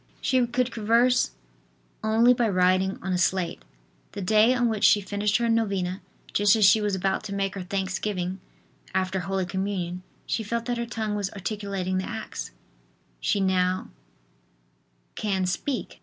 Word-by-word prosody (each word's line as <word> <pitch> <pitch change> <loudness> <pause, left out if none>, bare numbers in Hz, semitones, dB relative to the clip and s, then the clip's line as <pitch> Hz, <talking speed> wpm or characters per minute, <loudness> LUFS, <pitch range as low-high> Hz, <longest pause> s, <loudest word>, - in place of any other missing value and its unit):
She 255 -2 +2
could 250 +1 0
converse 235 +3 +3 0.7
only 225 +3 +5
by 235 -2 +1
writing 185 0 +2
on 190 0 -1
a 180 - 0
slate. 180 - 0 0.5
The - - -5
day 215 +5 +5
on 245 -1 +2
which 220 -2 -2
she 210 - +6
finished 205 +2 0
her 235 -1 0
novena, 200 -5 0 0.3
just 205 +1 +4
as 215 -2 +4
she 215 +2 +6
was 205 -2 0
about 190 +2 -1
to 200 -2 -4
make 195 -1 -1
her 195 - -5
thanksgiving 190 0 -2 0.6
after 190 0 0
Holy 190 +1 -2
Communion, 185 -1 -3 0.2
she - - -1
felt 230 +2 -3
that 240 -1 -2
her 235 - -3
tongue 220 -3 -3
was 205 -2 -1
articulating 195 -2 -3
the 185 - -4
acts. 220 - -5 0.7
She 200 - +1
now 185 -1 +1 1.2
can 190 -3 -1
speak. 245 +9 -3
200 Hz, 155 wpm, -26 LUFS, 185-225 Hz, 1.2 s, she